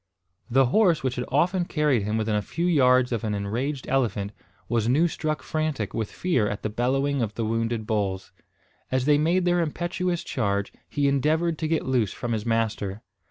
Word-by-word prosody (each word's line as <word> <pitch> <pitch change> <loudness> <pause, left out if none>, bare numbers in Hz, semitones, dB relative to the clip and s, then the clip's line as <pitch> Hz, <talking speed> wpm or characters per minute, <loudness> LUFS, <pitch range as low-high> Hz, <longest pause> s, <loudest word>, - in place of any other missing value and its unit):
The 135 +2 +4
horse 170 - +3
which 130 -1 -1
had 125 - -2
often 175 +5 +1
carried 150 -8 +1
him 105 +2 -1
within 110 0 0
a 105 - +1
few 170 +11 -3
yards 130 -7 +4
of 115 -1 -2
an 105 -2 -1
enraged 120 +8 -3
elephant, 105 -7 0 0.4
was 115 -1 +1
new 155 +7 +4
struck 155 -1 -3
frantic 155 -10 -2
with 110 -2 -2
fear 150 - +1
at 105 - -5
the 110 - -2
bellowing 135 +4 0
of 110 -2 -2
the 115 - -1
wounded 115 0 -1
bulls. 95 -3 -2 0.6
As 130 0 +1
they 145 0 +4
made 175 +4 +2
their 175 0 +3
impetuous 175 +2 -2
charge, 100 -4 -1 0.2
he 145 -1 +1
endeavoured 155 +4 +1
to 160 - -1
get 160 0 0
loose 125 -7 +1
from 120 - -4
his 110 0 -2
master. 110 -2 -1
130 Hz, 190 wpm, -25 LUFS, 110-155 Hz, 0.6 s, The